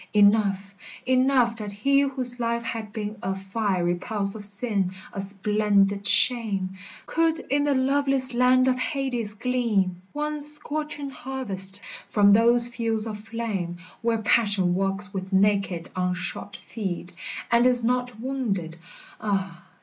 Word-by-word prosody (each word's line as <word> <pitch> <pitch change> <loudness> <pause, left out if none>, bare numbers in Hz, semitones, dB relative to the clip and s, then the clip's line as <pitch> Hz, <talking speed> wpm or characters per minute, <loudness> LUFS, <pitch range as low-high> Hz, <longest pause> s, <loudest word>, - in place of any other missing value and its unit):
Enough, 200 -1 +3 0.3
enough 255 -2 +3
that 210 -2 -6
he 275 +8 +2
whose 260 -3 -1
life 235 0 -1
had 225 -2 -5
been 210 -1 -5
A 190 +1 -2
fiery 190 -3 -1
pulse 200 +2 -2
of 215 - -7
sin, 200 -2 +3 0.2
a - - -5
splendid 200 0 +1
shame, 215 -7 +2 0.4
Could 325 0 +1
in 285 +1 +2
the 285 -1 +2
loveless 270 -1 +3
land 255 +1 +4
of 255 -1 +1
Hades 255 -7 -1
glean 210 -7 0
One 300 0 -3
scorching 295 -1 -5
harvest 205 -8 -4 0.3
from 205 -1 +4
those 235 +3 +6
fields 230 -3 0
of 215 -2 -5
flame 210 -6 -4 0.2
Where 230 -1 +1
passion 205 -5 +2
walks 195 +2 -2
with 190 0 -5
naked 195 -3 +1
unshod 180 +2 -3
feet 190 -5 -6 0.4
And 235 +1 +5
is 245 -2 +4
not 245 -1 -1
wounded, 210 -11 -3 0.2
— - - -21
ah 195 -4 -3
220 Hz, 135 wpm, -25 LUFS, 195-250 Hz, 0.4 s, those